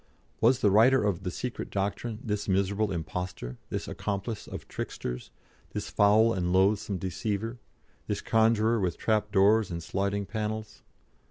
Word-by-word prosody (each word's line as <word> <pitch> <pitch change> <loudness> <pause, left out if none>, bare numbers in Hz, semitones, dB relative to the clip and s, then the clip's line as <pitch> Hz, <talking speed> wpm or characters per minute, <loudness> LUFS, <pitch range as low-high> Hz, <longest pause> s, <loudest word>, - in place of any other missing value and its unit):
Was 125 +3 +4
the 100 - +4
writer 120 +5 +5
of 100 -4 0
"The 90 - -3
Secret 120 +7 -5
Doctrine" 105 +3 -2
this 105 -2 -2
miserable 100 +2 +1
impostor, 85 -6 -4
this - - -3
accomplice 105 +2 -4
of - - -8
tricksters, 60 0 -5 0.4
this - - -4
foul 110 +3 +5
and 90 -3 -1
loathsome 100 +1 +2
deceiver, 105 +6 -3 0.5
this 105 -1 -1
conjuror 110 0 +3
with 90 -4 -1
trap 105 -1 0
doors 100 +1 +4
and 85 -2 -4
sliding 100 +3 -1
panels? 110 +1 -4
105 Hz, 145 wpm, -28 LUFS, 95-110 Hz, 0.5 s, writer